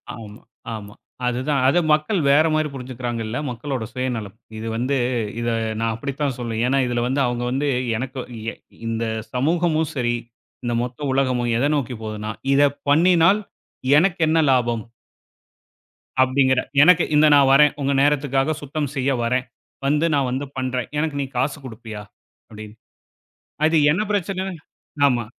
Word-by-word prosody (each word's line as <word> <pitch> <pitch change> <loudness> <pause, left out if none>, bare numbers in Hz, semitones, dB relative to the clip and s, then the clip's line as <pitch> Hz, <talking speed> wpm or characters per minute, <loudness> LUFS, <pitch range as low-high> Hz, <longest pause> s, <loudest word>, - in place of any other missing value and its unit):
ஆமா, 110 -1 -11 0.3
ஆமா. 105 -1 -9 0.3
அது 125 0 -1
தான். 140 -3 +2
அத 140 - +3
மக்கள் 155 +6 +2
வேற 150 +3 +5
மாதிரி 155 0 +1
புரிஞ்சுக்கிறாங்க 125 -3 -5
இல்ல, 115 +3 -3
மக்களோட 125 0 -4
சுயநலம். 120 -6 -3 0.2
இது 110 +1 -5
வந்து 130 +4 0 0.4
இத 120 - -2 0.3
நான் 115 0 0
அப்படித்தான் 140 +2 -3
சொல்வேன். 115 -2 -3
ஏன்னா 135 +2 +2
இதுல 120 -1 -1
வந்து 135 +2 0
அவங்க 120 0 -2
வந்து 140 +3 0 0.3
எனக்கு 130 +2 -5 0.3
எ - - -12 0.3
இந்த 115 0 -1 0.3
சமூகமும் 160 +3 +1
சரி, 120 -2 0 0.5
இந்த 120 - -1
மொத்த 125 +2 -6
உலகமும் 125 -3 +1
எத 125 - +1
நோக்கிப் 125 -5 -3
போதுன்னா, 110 0 -4 0.2
"இத 140 - +4 0.3
பண்ணினால் 175 +5 +5 0.6
எனக்கு 180 +2 +1
என்ன 160 +1 +3
லாபம்?" 120 -4 +1 1.4
அப்படிங்கற 130 0 +3 0.2
எனக்கு 180 +1 +6
இந்த 150 +1 +6
நான் 140 -2 +5
வரேன். 150 +1 +6
உங்க 140 +1 +1
நேரத்துக்காகச் 145 +1 +1
சுத்தம் 145 0 -3
செய்ய 135 +1 +1
வரேன். 125 +2 0 0.4
வந்து 150 +3 +2
நான் 140 -2 +1
வந்து 135 +3 -2
பண்றேன். 130 -2 -2
எனக்கு 150 -2 -1
நீ - - -1
காசு 135 +3 0
குடுப்பியா? 110 -3 -8 0.5
அப்படின்னு. 110 -1 -10 0.9
அது 160 +1 +3 0.2
என்ன 170 - +1
பிரச்சனை 195 -1 -1 0.6
ஆமா. 120 -4 0
130 Hz, 145 wpm, -22 LUFS, 120-150 Hz, 1.4 s, எனக்கு